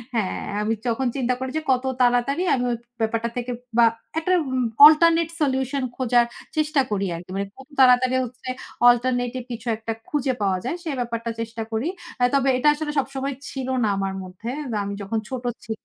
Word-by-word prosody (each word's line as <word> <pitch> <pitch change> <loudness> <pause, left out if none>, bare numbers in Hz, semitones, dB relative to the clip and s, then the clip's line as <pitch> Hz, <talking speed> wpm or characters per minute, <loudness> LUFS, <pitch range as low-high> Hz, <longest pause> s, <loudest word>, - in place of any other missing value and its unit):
হ্যাঁ, 210 -5 -1 0.2
আমি 220 +2 +1
তখন 245 +2 0
চিন্তা 250 -2 +1
করি 260 - -3
যে, - - -1
কত 255 0 +2 0.2
তাড়াতাড়ি 245 +5 +2
আমি 245 - -1
ওই 235 - -1 0.2
ব্যাপারটা 230 +1 0
থেকে 245 0 -3 0.3
বা 235 - +7 0.3
একটা 345 +3 -1 0.2
উম 260 0 0 0.2
অল্টারনেট 330 +1 +6
সলিউশন 265 -1 0
খোঁজার 245 -2 +3 0.3
চেষ্টা 305 -2 +2
করি 200 -1 0
আরকি। 170 +2 -10
মানে 200 0 -2
কত 265 +2 -14
তাড়াতাড়ি 255 0 +5
হচ্ছে 255 +1 -9 0.4
অল্টারনেটিভ 245 0 +1
কিছু 230 0 -6
একটা 225 0 -4 0.2
খুঁজে 275 -3 0
পাওয়া 195 -2 +2
যায়? 300 - -1
সে 325 - -4
ব্যাপারটা 230 -1 -3
চেষ্টা 230 0 -4
করি। 225 +6 -1 0.3
আ - - +4
তবে 275 -1 +3
এটা 255 - +1
আসলে 300 0 -3
সবসময় 275 0 -3 0.2
ছিল 265 -2 -5 0.2
না - - +3
আমার 195 0 -1
মধ্যে। 185 +5 -8 0.3
আমি 200 0 -4
যখন 220 +3 -2
ছোট 255 -2 -4 0.2
ছি 225 - -6
250 Hz, 180 wpm, -23 LUFS, 230-270 Hz, 0.4 s, বা